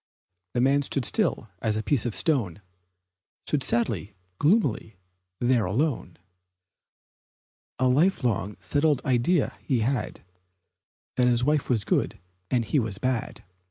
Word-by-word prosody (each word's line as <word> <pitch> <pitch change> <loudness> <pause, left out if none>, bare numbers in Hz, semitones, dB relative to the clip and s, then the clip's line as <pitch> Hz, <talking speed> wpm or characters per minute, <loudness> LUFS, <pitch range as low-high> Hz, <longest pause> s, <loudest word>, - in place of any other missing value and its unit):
The 120 - +2
man 140 +2 +3
stood 140 -2 -1
still - - +1
as 110 -1 +1
a 110 - -2
piece 130 -3 +1
of 115 - -3
stone 105 - 0 0.8
Stood 150 - 0
sadly, 110 -6 0 0.2
gloomily 145 - +1 0.4
there 120 -2 +2
alone, 130 - -1 1.6
A 130 - +2
life 155 +9 +2
long, 105 -4 -1
settled 145 - +1
idea 130 +5 +1
he 125 -4 0
had 120 - -2 0.9
That 125 -1 +4
his 120 0 +2
wife 150 +1 +1
was 115 -5 +1
good - - 0 0.3
and 120 -2 +1
he 145 - +1
was 110 -5 -3
bad. 125 -1 -2
125 Hz, 130 wpm, -26 LUFS, 110-140 Hz, 1.6 s, That